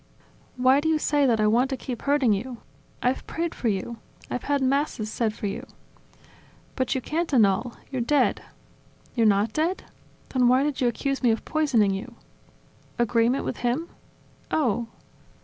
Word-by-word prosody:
"Why 255 +2 +5
do 320 +2 0
you 320 - +3
say 290 -2 +2
that 230 -3 +2
I 215 - +3
want 240 +5 +3
to 265 - -2
keep 245 -2 -6
hurting 280 -6 +3
you?... 240 +5 -4 0.5
I've 250 +2 0
prayed 335 0 -2
for 240 - -3
you! 220 +3 -2 0.3
I've 250 - -3
had 285 -1 +1
Masses 260 -5 0
said 225 -2 0
for 210 - -7
you!.. 200 - -3 0.6
." - - -28
"But 260 0 0
you 260 - -1
can't 325 +5 -2
annul! 230 -1 +3 0.2
You're 260 -2 -1
dead.. 285 +5 +2 0.4
." - - -31
"You're 230 -3 +4
not 205 +1 +2
dead?... 335 +5 0 0.5
Then 250 -2 +3
why 255 +2 +4
did 290 -2 -2
you 250 - +3
accuse 275 +3 -1
me 245 - +3
of 225 - 0
poisoning 250 -11 +2
you?.. 195 - -6 0.5
." - - -33 0.3
"Agreement 240 +2 +2
with - - -3
him? 250 +8 -1 0.6
Oh! 240 -6 0
250 Hz, 180 wpm, -25 LUFS, 230-285 Hz, 0.6 s, Why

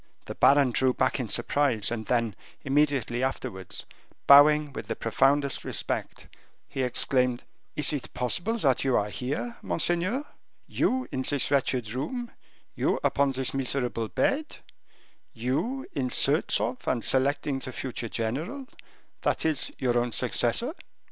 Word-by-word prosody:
The - - -6
baron 140 -2 +4
drew 130 +1 +2
back 130 +1 +1
in 120 -4 -3
surprise; 125 -7 +2
and 110 -2 -4
then, 115 -4 0 0.3
immediately 135 -4 +1
afterwards, 130 -8 -4 0.4
bowing 145 +1 +7
with - - -7
the 115 - -3
profoundest 135 +4 +1
respect, - - -3 0.4
he 135 - -4
exclaimed, 125 0 +1 0.3
"Is 150 0 +4
it 145 - -4
possible 175 - 0
that 135 - +2
you 135 -2 +2
are 105 0 -1
here, 145 - -4
monseigneur; 180 - -1 0.4
you, 260 0 0
in 130 -3 -2
this 140 +1 +1
wretched 130 -5 0
room; 235 - -4 0.4
you, - - 0
upon 140 -1 +2
this 130 -1 -2
miserable 125 -4 -1
bed; 275 - -1 0.8
you, 155 - -2
in 130 -2 -1
search 145 +5 +3
of 125 - -3
and 120 -3 0
selecting 140 +1 +1
the 130 - -7
future 125 -2 -5
general, 155 - -3 0.6
that - - 0
is, 155 -3 0
your 120 -2 +1
own 120 0 -1
successor?" 125 - +1
135 Hz, 140 wpm, -27 LUFS, 125-150 Hz, 0.8 s, bowing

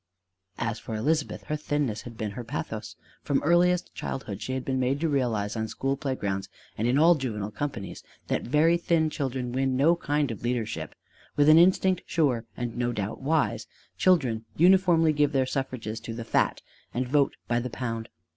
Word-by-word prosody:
As 115 -1 -2
for 110 - -6
Elizabeth, 150 +7 -1
her 150 - -2
thinness 145 -7 -1
had 115 -2 -10
been 110 -2 -3
her 120 +4 -6
pathos: 80 -8 -5 0.3
from 140 - +1
earliest 175 +2 +3
childhood 105 -7 -5
she 130 +4 -3
had 130 -1 -3
been 130 -1 0
made 130 +2 +1
to 165 - +2
realize 120 -8 0
on 110 -1 -2
school 135 +5 -1
playgrounds 105 -9 -3 0.3
and 115 - -1
in 125 +3 +3
all 165 +4 +7
juvenile 110 -9 -3
companies 120 -3 -5 0.2
that - - -1
very 155 +6 +3
thin 165 -2 +1
children 130 -4 -3
win 130 0 0
no 160 +6 +5
kind 145 -5 0
of 110 - -7
leadership: 110 -10 -3 0.4
with 145 +1 +5
an 155 +1 +8
instinct 185 +1 +4
sure 130 -8 +1
and 120 -1 -4
no 120 0 0
doubt 105 +1 -4
wise, 155 +2 0 0.3
children 130 -12 +2
uniformly 175 -2 +5
give 145 0 +2
their 135 -1 +2
suffrages 130 -4 -3
to 115 0 -7
the 115 -1 -6
fat, - - +1 0.3
and 125 +1 -1
vote 140 +1 +2
by 120 0 +1
the 125 +1 -4
pound. 115 -2 -4
130 Hz, 185 wpm, -27 LUFS, 115-150 Hz, 0.4 s, an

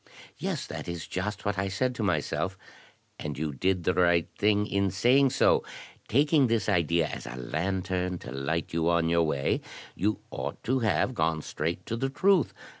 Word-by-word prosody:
"Yes, - - -2
that - - -7
is 85 -1 -4
just 105 +3 -4
what 100 -1 0
I 95 - 0
said 125 +7 0
to 120 - -5
myself." 95 0 -1 0.6
"And 75 -3 -4
you 75 0 -2
did 90 +5 0
right 85 -1 +3
in 100 -1 +2
saying 125 +9 +4
so. 135 - +3 0.4
Taking 145 +2 +4
this 115 -1 0
idea 85 -4 +2
as 75 - -6
a - - -6
lantern 90 +6 -2
to - - -9
light 70 +6 -2
you 85 0 +1
on 85 -1 +2
your 85 0 +3
way, 75 -4 0 0.3
you 105 +3 0
ought 70 +2 -5
to 130 +2 +1
have 115 +2 +1
gone 80 -6 0
straight 85 +3 -3
to 115 - -3
the 135 +3 -1
truth. 185 +4 +3
90 Hz, 175 wpm, -28 LUFS, 80-110 Hz, 0.6 s, saying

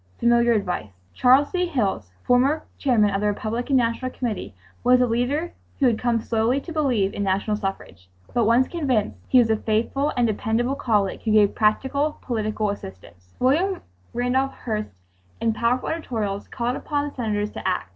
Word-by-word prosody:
Familiar 235 0 +4
advice! 180 - -3 0.2
Charles 260 - +4
D. 360 -1 0
Hilles, 200 - -1
former 270 +5 +2 0.2
Chairman 225 -7 +3
of 195 - 0
the 210 - +1
Republican 230 +6 -1
National 245 +1 +1
Committee, 215 - -4 0.3
was 250 0 +5
a 250 - +4
leader 250 +8 -1 0.3
who 280 - +3
had 235 -3 +2
come 240 -2 +1
slowly 225 +4 0
to 330 +4 -8
believe 250 -11 +1
in - - -4
national 200 +2 0
suffrage. 195 - -6 0.2
But, 235 -2 +2
once 235 +4 +4
convinced, 265 - -1
he 255 - +4
was 235 -3 +5
a 220 - +2
faithful 235 +7 0
and 245 - +3
dependable 225 +3 0
colleague 210 -8 0
who 225 - -3
gave 210 -2 +4
practical 265 +7 +1
political 215 -3 -1
assistance. 90 - -11
William 340 +10 +2 0.3
Randolph 255 +3 0
Hearst 215 -3 -3 0.5
in 225 -1 +1
powerful 235 +3 0
editorials 220 -11 -3
called 245 +2 -2
upon 290 -1 -2
the 290 - -8
Senators 210 -4 -2
to - - -5
act. - - -1
235 Hz, 170 wpm, -23 LUFS, 210-260 Hz, 0.5 s, was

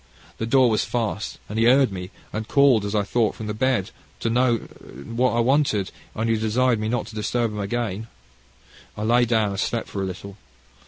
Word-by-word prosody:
The 110 - -2
door 130 +1 +5
was 110 - +2
fast, 110 -3 -3
and 105 +2 -3
he 115 - +4
heard 130 0 +5
me, 90 -1 -6 0.2
and 110 0 -3
called 135 -7 +4
as 100 +1 -2
I 105 - +2
thought 110 +2 0
from 110 - -7
the 105 - -3
bed 120 -3 0 0.3
to 115 - 0
know 120 0 +3
what 115 - -3
I 120 - +1
wanted, 120 -7 +2 0.2
and 110 +1 -1
he 115 0 +2
desired 115 +2 +1
me 110 0 -2
not 120 +1 -1
to 110 - -11
disturb 115 +2 -1
him 105 - -5
again. 110 0 -3 0.9
I 105 - -3
lay 120 +2 +4
down 110 -3 +2
and 100 -1 -4
slept 115 +2 -1
for 100 - -4
a - - -1
little. 100 +2 -8
110 Hz, 210 wpm, -23 LUFS, 105-120 Hz, 0.9 s, door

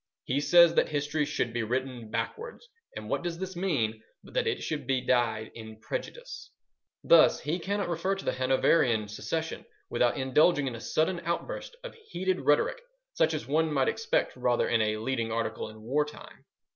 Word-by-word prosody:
He 135 - 0
says 170 +3 +6
that - - +2
history 150 0 -1
should 125 -5 -2
be 120 - -1
written 125 0 -3
backwards; 455 - -5 0.3
and - - -7
what - - -1
does 175 -1 -4
this 190 +1 -5
mean 125 - -1 0.2
but - - -15
that - - +1
it - - -1
should 155 -2 -4
be 135 -2 +2
dyed 115 -3 +1
in 110 -1 -10
prejudice? 485 - -6 0.5
thus, - - +6
he 160 +5 -2
cannot 200 +3 -2
refer 175 +3 -1
to 195 - -8
the - - +1
Hanoverian 130 -3 +2
succession 160 +9 -4 0.3
without 120 +2 +2
indulging 145 +3 +3
in 130 - -3
a 115 - -8
sudden 160 +9 0
outburst 480 - -4
of - - -7
heated 190 - -3
rhetoric 145 - +2 0.3
such 160 - +2
as 155 - -4
one 155 +3 +1
might 135 -3 +2
expect 225 - 0
rather 125 -1 +1
in 115 -1 +2
a 110 0 0
leading 115 0 -2
article 115 -1 -2
in 110 0 -13
war 140 +6 +1
time. 150 0 -12
145 Hz, 185 wpm, -29 LUFS, 120-170 Hz, 0.5 s, says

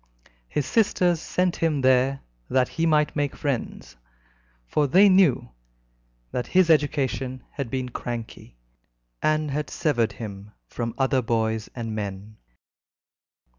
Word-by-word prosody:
His 145 - -1
sisters 175 - +2
sent 180 -1 0
him 155 -4 0
there 130 +1 +3 0.3
that 130 -1 +2
he 165 0 0
might 150 -1 +2
make 145 -2 -1
friends, 135 - -4 0.7
for 145 - +1
they 190 +9 +6
knew 185 - +4 0.8
that 125 - -3
his 185 -2 +4
education 135 -4 0
had 140 -4 -5
been 130 0 -3
cranky, 115 - -7 0.6
and 155 -1 +1
had 150 +2 -2
severed 120 -9 0
him 105 -2 -8
from 115 -1 -4
other 135 -1 +2
boys 110 -2 -1
and 115 -3 -4
men. 105 0 -6
130 Hz, 125 wpm, -25 LUFS, 115-155 Hz, 0.8 s, they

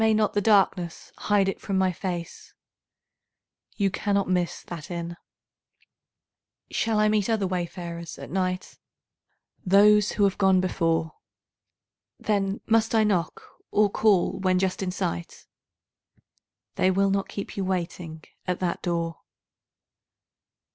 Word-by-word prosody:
May 220 0 +4
not 215 -1 +1
the 205 - +1
darkness 190 -5 +2
hide 205 -2 +2
it 195 - -3
from 195 -2 -2
my 190 -1 +3
face? 175 -1 -6 1.2
You 200 -2 +1
cannot 200 0 0
miss 180 -1 -1
that 165 -4 -8
inn. 170 -1 -4 1.6
Shall 220 -1 +1
I 215 - +4
meet 215 0 +1
other 220 -3 +1
wayfarers 175 -2 -4
at - - -9
night? 185 0 -2 0.8
Those 205 +2 +5
who 205 - +1
have 200 0 +2
gone 190 -2 +4
before. 165 -3 0 1.1
Then 200 -1 -1
must 225 0 +2
I 220 - +5
knock, 185 -6 0 0.3
or 210 -1 +3
call 195 -3 +2
when 185 -1 +2
just 185 +1 0
in 190 - -1
sight? 85 - -4 1.3
They 185 - +3
will 195 +1 +2
not 195 0 -1
keep 200 - -6
you 195 - -2
standing 175 -3 -4 0.2
at 180 - -1
that 180 -2 -2
door. 170 -1 -2
190 Hz, 130 wpm, -26 LUFS, 175-205 Hz, 1.6 s, Those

